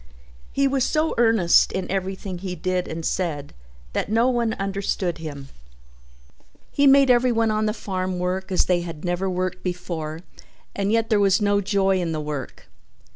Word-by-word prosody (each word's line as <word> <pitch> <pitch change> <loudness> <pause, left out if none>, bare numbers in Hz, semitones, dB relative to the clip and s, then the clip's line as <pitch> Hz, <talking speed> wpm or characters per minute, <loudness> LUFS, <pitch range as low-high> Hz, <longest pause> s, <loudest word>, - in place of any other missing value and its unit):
He 275 0 +2
was 270 -1 +1
so 310 +4 +1
in - - -5
earnest 220 -7 +4
in 190 -1 -2
everything 190 -1 -3
he 185 -1 -5
did 180 +1 -1
and 160 0 -5
said 150 -6 -2 0.4
that - - -2
no 230 +3 +3
one 235 -3 0
understood 195 -3 -2
him. 140 -4 -7 1.2
He 285 0 +3
made 275 -1 +6
everyone 240 -2 +3
on 215 0 0
the - - +1
farm 185 -3 -3
work 185 +2 -2
as 185 - +2
they 180 -1 +1
had 165 -1 -7
never 175 +2 -1
worked 185 0 -2
before 170 -3 -4 0.5
and 200 +1 0
yet 225 0 +1
there 210 - +4
was 195 -2 +4
no 205 -1 +2
joy 195 -1 +1
in 165 -2 -2
the 155 - -2
work. 150 -4 -6
190 Hz, 175 wpm, -23 LUFS, 175-215 Hz, 1.2 s, made